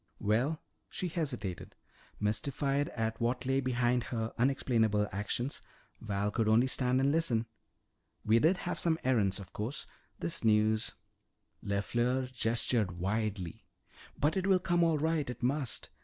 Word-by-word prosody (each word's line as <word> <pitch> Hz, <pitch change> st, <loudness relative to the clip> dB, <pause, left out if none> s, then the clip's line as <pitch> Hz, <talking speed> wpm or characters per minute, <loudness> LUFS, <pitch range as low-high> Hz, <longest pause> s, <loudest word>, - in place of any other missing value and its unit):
"Well 125 Hz, +10 st, +1 dB, 0.2 s
" -, -, -47 dB
she 180 Hz, -, -3 dB
hesitated. 125 Hz, -, -3 dB, 0.4 s
Mystified 140 Hz, +6 st, 0 dB
at 115 Hz, -1 st, -2 dB
what 125 Hz, +2 st, 0 dB
lay 135 Hz, +1 st, +2 dB
behind 125 Hz, -1 st, +1 dB
her 115 Hz, -2 st, -3 dB
unexplainable 115 Hz, -5 st, +2 dB
actions, 115 Hz, +7 st, -2 dB, 0.4 s
Val 100 Hz, -1 st, -1 dB
could 110 Hz, 0 st, 0 dB
only 110 Hz, +3 st, +5 dB
stand 130 Hz, -1 st, +2 dB
and 135 Hz, +1 st, +3 dB
listen. 135 Hz, -8 st, +2 dB, 0.8 s
"We 110 Hz, +2 st, +5 dB
did 165 Hz, +8 st, +4 dB
have 180 Hz, -, -2 dB
some 165 Hz, -2 st, +2 dB
errands. 105 Hz, -7 st, +2 dB
Of 95 Hz, -2 st, -11 dB
course, 115 Hz, +8 st, -3 dB, 0.3 s
this 165 Hz, -6 st, -3 dB
news 110 Hz, 0 st, +2 dB, 0.3 s
" -, -, -36 dB
LeFleur 120 Hz, +6 st, 0 dB
gestured 115 Hz, -4 st, 0 dB
widely. 100 Hz, -2 st, -2 dB, 0.5 s
"But 150 Hz, +2 st, +1 dB
it 190 Hz, 0 st, 0 dB
will 190 Hz, -1 st, +5 dB
come 175 Hz, -1 st, +1 dB
all 165 Hz, -2 st, +3 dB
right. 155 Hz, -2 st, 0 dB
It 125 Hz, -1 st, -6 dB
must. 135 Hz, -1 st, -1 dB
120 Hz, 145 wpm, -32 LUFS, 110-140 Hz, 0.8 s, only